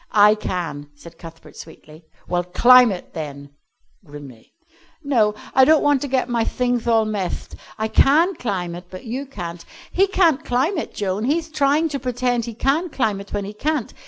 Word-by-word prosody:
"I 210 0 +6
can," 170 -8 -5
said 165 +3 -15
Cuthbert 165 -1 -13
sweetly. 160 0 -14 0.2
"Well, 175 0 -1
climb 245 +6 +6
it 185 - -8
then," 145 -3 -7 0.5
grimly. 145 -7 -13 0.5
"No, 225 -7 +2 0.2
I 265 - +6
don't 310 +3 +5
want 290 -2 +2
to 285 - -3
get 260 -2 0
my 235 -2 0
thingth 245 0 -1
all 225 -2 +3
methed. 205 -4 -4 0.2
I 220 0 -1
can 310 - +4
climb 190 - -4
it, 175 +1 -9
but 185 +4 -10
you 260 +5 -5
can't. 175 -9 -7 0.3
He 390 +2 +2
can't 335 -6 +2
climb 275 +9 0
it, - - -7
Joan, 200 +2 -2
he'th 315 +3 -1
trying 295 +2 +2
to 280 -2 -4
pretend 245 -2 -1
he 235 - -7
can 290 +9 0
climb 215 -9 -1
it 200 - -14
when 205 -1 -3
he 205 - -7
can't. 290 +3 -2
225 Hz, 185 wpm, -21 LUFS, 180-275 Hz, 0.5 s, I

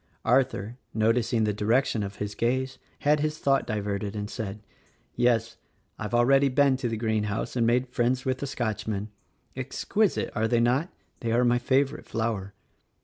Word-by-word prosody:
Arthur, 125 -3 +1 0.2
noticing 115 +1 +2
the 105 -1 +1
direction 115 +3 +1
of 100 0 -4
his 105 0 -4
gaze, 130 +3 -1 0.2
had 150 +1 +3
his 155 +1 -1
thought 135 -2 +1
diverted 105 -1 -2
and 105 0 -4
said, 105 -2 -5 0.5
"Yes: 115 -2 +1 0.4
I've 105 +2 -2
already 135 +3 +5
been 135 +1 +4
to 125 -2 -2
the 115 - -2
greenhouse 110 0 -1
and 115 -2 +2
made 125 +2 +3
friends 125 +1 0
with 130 -1 0
the 140 - -3
Scotchman. 110 -4 -3 0.5
Ex 130 -1 -5
quisite, 215 -1 +1
are 110 -1 +1
they 120 0 +2
not. 125 +9 +2 0.3
They 115 - -2
are 120 +2 +3
my 120 0 +3
favorite 135 +4 +1
flower." 110 -4 -2
120 Hz, 165 wpm, -27 LUFS, 110-130 Hz, 0.5 s, already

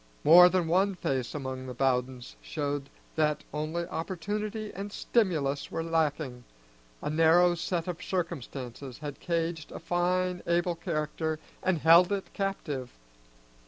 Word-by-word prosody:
More 175 +4 +9
than 180 -2 +1
one 190 +4 +2
face 130 -7 -2
among 130 -2 -5
the 125 - -6
Bowdens 125 -1 -1
showed 145 -2 -3 0.3
that 150 -1 +1
only 155 +3 -2
opportunity 210 +6 -4
and 200 +2 -6
stimulus 155 - 0
were 165 - -3
lacking, 155 -6 -1 0.6
a - - -1
narrow 165 +3 +5
set 170 0 -2
of 175 -2 -4
circumstances 135 -7 -4
had 145 -2 -7
caged 165 -2 -2
a - - -6
fine 180 +1 0
able 175 +1 +2
character 160 -2 -2 0.2
and 185 -2 +1
held 170 +4 +6
it 200 -1 -3
captive. 150 - -3
165 Hz, 130 wpm, -29 LUFS, 145-180 Hz, 0.6 s, More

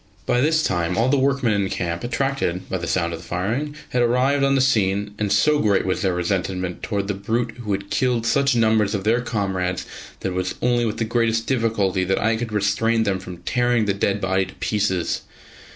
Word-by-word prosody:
By 125 - +2
this 155 +2 +2
time 90 - 0
all 115 +3 +2
the 140 0 +3
workmen 135 -4 +2
in 100 -2 0
camp, 85 -1 -3
attracted 120 -7 -1
by 95 - -2
the 85 - -4
sound 85 -2 0
of 85 - -5
the - - -14
firing, 115 +12 -2
had 125 - +1
arrived 130 +4 +2
on 135 0 +3
the - - +3
scene, 105 -6 +1
and 105 -2 -1
so 150 +9 +3
great 105 -5 +2
was 95 - -1
their 95 -3 +1
resentment 90 0 -2
against 100 -2 -2
the 105 - -1
brute 115 +5 -2
who 105 -3 -4
had 100 +1 -4
killed 125 -3 +1
such 140 +2 +2
numbers 110 -2 +2
of 100 - -3
their 115 +4 +2
comrades 95 -6 -2 0.4
that - - -1
it - - -4
was 90 0 -2
only 120 -1 +2
with 110 - -2
the 115 - 0
greatest 115 0 +1
difficulty 110 -7 +1
that 95 +1 0
I 110 +1 +2
could 115 0 -4
restrain 105 +2 +1
them 100 -3 0
from 90 -2 -10
tearing 120 -2 +2
the 100 - +1
dead 100 +1 0
body 95 0 +1
to - - -13
pieces. 100 -5 -1
105 Hz, 215 wpm, -22 LUFS, 95-120 Hz, 0.4 s, the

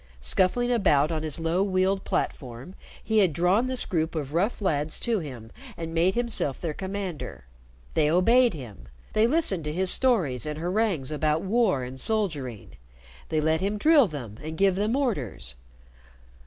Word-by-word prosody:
Scuffling 185 - +1
about 155 - +3
on 160 -1 -2
his 155 -2 0
low 165 +3 0
wheeled 190 0 +1
platform, 130 +5 -4 0.3
he 220 -1 +2
had 185 -6 +3
drawn 180 - +2
this 255 -1 -1
group 160 -3 -2
of 145 -2 -4
rough 195 +8 0
lads 155 -6 -1
to 230 -3 0
him 125 -8 -9 0.3
and 165 -1 -6
made 175 +3 +2
himself 235 - -1
their 165 -3 -3
commander. 185 - -6 0.5
They 150 -2 +2
obeyed 230 +6 +4
him; 110 - -10 0.3
they 215 +1 +3
listened 240 - +1
to 150 - -2
his 185 +3 +6
stories 170 - +2
and 150 0 -4
harangues 175 -4 -1
about 155 +1 0
war 195 - +1
and 130 +1 -8
soldiering; 150 - -2 0.5
they 155 - 0
let 160 +2 +1
him 200 +2 -1
drill 295 +1 +5
them 120 - -8
and 160 +1 -7
give 195 +1 +3
them 210 +5 0
orders. 145 - -2
170 Hz, 165 wpm, -26 LUFS, 150-205 Hz, 0.5 s, his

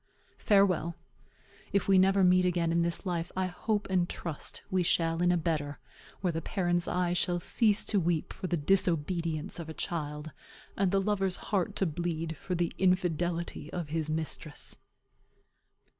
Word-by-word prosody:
"Farewell. 185 -5 +3 0.8
If 200 - +1
we 195 -1 +6
never 195 +1 +4
meet 180 0 +5
again 175 -2 +1
in 170 +1 +2
this 170 +3 +1
life, 175 -2 -2
I 185 - +1
hope 205 +3 -2
and 180 -2 +1
trust 165 -4 -4
we 185 -1 +2
shall 165 -1 +2
in 175 0 +4
a 175 - +3
better 150 -3 -1 0.4
where 180 -3 0
the 165 - -2
parent's 175 -1 0
eye 180 -1 +1
shall 175 0 +1
cease 210 +4 +2
to 205 - +2
weep 170 -2 0
for 185 - -5
the 175 - 0
disobedience 165 -1 0
of 165 -1 -6
a 160 - -7
child, 150 -1 -4 0.4
and 195 -1 +2
the 195 +1 +2
lover's 195 -2 +1
heart 195 -4 -1
to 195 - +1
bleed 165 0 -2
for 185 - -3
the 175 0 0
infidelity 175 -3 0
of 170 -4 -4
his 155 0 -1
mistress." 155 -1 -4
175 Hz, 165 wpm, -30 LUFS, 165-185 Hz, 0.8 s, we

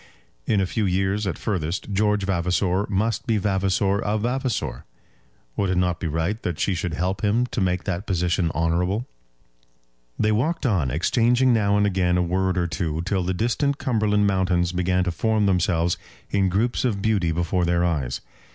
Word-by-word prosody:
In 105 - +2
a 95 - +2
few 105 +2 -1
years 95 +3 0
at 85 - -2
furthest, 95 0 -3
George 105 0 +2
Vavasor 90 +1 0
must 110 +4 -1
be 115 -2 +2
Vavasor 100 0 +1
of 105 +1 -1
Vavasor. 125 0 -2 0.7
Would 100 - 0
it 90 - 0
not 90 -1 +1
be 85 - -2
right 80 +8 -2
that 85 -3 -3
she 100 - +1
should 90 -2 -3
help 90 +1 -2
him 110 +4 +2
to 125 - -3
make 90 -1 0
that 95 +1 -3
position 90 -2 +1
honourable? 90 +7 0 1.1
They 110 - +2
walked 150 +10 0
on, 95 - +1
exchanging 120 - +2
now 100 -3 +2
and 105 - +3
again 90 -3 +1
a 90 - +2
word 95 +1 0
or 90 - +1
two, 80 -2 -2
till 95 +1 0
the 90 +1 -1
distant 135 +7 0
Cumberland 105 -4 +1
mountains 90 -3 +1
began 90 0 +1
to 90 - -1
form 110 +4 +1
themselves 85 -2 +1 0.3
in 95 -1 +2
groups 110 +6 0
of 105 -6 -1
beauty 100 -7 +1
before 85 +2 0
their 85 0 +2
eyes. 70 -8 -1
95 Hz, 180 wpm, -23 LUFS, 90-105 Hz, 1.1 s, and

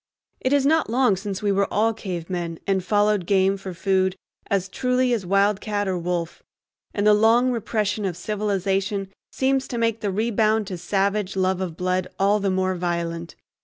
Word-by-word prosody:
It 260 - -1
is 285 -1 +3
not 315 -1 +3
long 245 -3 +3
since 195 +1 -5
we 205 - +2
all 200 +2 +2
were - - -2
cavemen 175 -4 -4
and 195 -2 +1
followed 205 -1 +2
game 195 0 +3
for 195 -1 -7
food 190 +1 +1 0.3
as 195 -2 0
truly 250 +4 +1
as 205 -6 -2
wildcat 205 +1 +1
or 190 - 0
wolf, 175 -1 -3 0.5
and 205 - -1
the 210 - +7
long 230 +4 +4
repression 215 -2 -1
of 180 -3 -3
civilization 195 0 -1 0.2
seems 265 0 0
to 240 - -4
make 230 -1 0
the 205 - -1
rebound 215 +1 +1
to 185 -2 -5
savage 195 +2 0
love 185 0 +1
of 170 -3 -4
blood 185 0 0
all 200 +2 +3
the 200 -1 0
more 185 0 +1
violent. 170 -1 -3
195 Hz, 175 wpm, -23 LUFS, 185-215 Hz, 0.5 s, the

